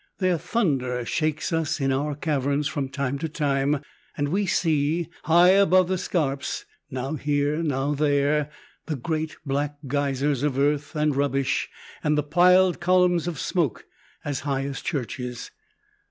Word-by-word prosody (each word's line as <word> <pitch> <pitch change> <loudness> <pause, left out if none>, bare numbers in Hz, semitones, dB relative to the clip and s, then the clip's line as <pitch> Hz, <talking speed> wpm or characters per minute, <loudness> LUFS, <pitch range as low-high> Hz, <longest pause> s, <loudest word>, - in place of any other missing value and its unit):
Their 185 -3 +1
thunder 130 - 0
shakes 155 +4 -1
us 160 -2 0
in 135 -1 +1
our 145 +2 -1
caverns 145 -1 0
from 140 -1 -3
time 140 0 -2
to 160 +1 -3
time, 145 -1 0 0.3
and 145 0 0
we 195 +4 0
see, 160 0 +1 0.2
high 170 +2 +6
above 185 -2 +5
the 185 - +1
scarps, 140 -7 -2 0.2
now 130 +2 -3
here 145 +1 0
now 145 -2 0
there, 145 0 +1 0.4
the 155 - -1
great 155 +3 -3
black 145 +1 -1
geysers 140 0 0
of 145 -2 0
earth 145 +2 0
and 150 -2 +1
rubbish, 140 -1 0 0.3
and 150 0 +2
the 150 - +2
piled 180 +4 +4
columns 180 -1 +3
of 165 -5 -3
smoke, 160 - -1 0.4
as 145 -2 -2
high 140 -1 -1
as 140 0 -4
churches. 125 -4 -4
145 Hz, 150 wpm, -25 LUFS, 140-165 Hz, 0.4 s, high